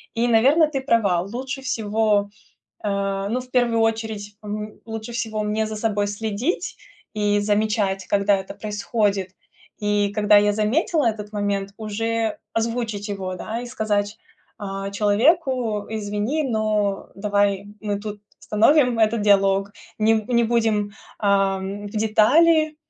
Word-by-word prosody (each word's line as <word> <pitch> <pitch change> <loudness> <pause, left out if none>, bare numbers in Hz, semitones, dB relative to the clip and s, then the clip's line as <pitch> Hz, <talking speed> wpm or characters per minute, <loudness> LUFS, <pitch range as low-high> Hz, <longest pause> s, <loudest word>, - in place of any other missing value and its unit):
и, 235 +1 +1
наверно, 270 +8 +5
ты 275 -3 -3
права. 210 -9 +2
Лучше 255 +7 -5
всего, 215 -4 +1 0.6
э, 195 -1 -1
ну, 245 +4 -1
в 250 0 -12
первую 240 -2 +2
очередь, 220 -2 -2
м, 210 0 -6
лучше 225 +1 -6
всего 220 -2 -2
мне 215 +1 0
за 215 - -5
собой 210 -2 0
следить 220 - -2 0.4
и 205 -1 +1
замечать, 205 -2 0
когда 200 0 +3
это 190 0 -7
происходит. 205 -2 -1 0.5
И 205 -1 +1
когда 210 -1 +5
я 205 0 +3
заметила 245 - +1
этот 210 -1 -2
момент, 200 -1 -2
уже 225 +1 -2
озвучить 225 -2 -2
его, 190 -2 -4
да, 225 +5 -4
и 245 - -6
сказать, 210 -3 -1 0.4
а, 195 -1 -5
человеку: 230 +1 +2
"Извини, 215 +7 -2
но 215 -4 0
давай 200 -1 +1
мы 205 -1 -2
тут 210 -1 -7 0.2
остановим 245 +3 +3
этот 220 0 +2
диалог, 195 -1 +3 0.3
нем 215 0 +3
не 235 -1 +3
будем, 220 -3 +1 0.3
ам, 195 0 0
в - - -8
детали 300 +10 +3
215 Hz, 135 wpm, -22 LUFS, 205-230 Hz, 0.6 s, наверно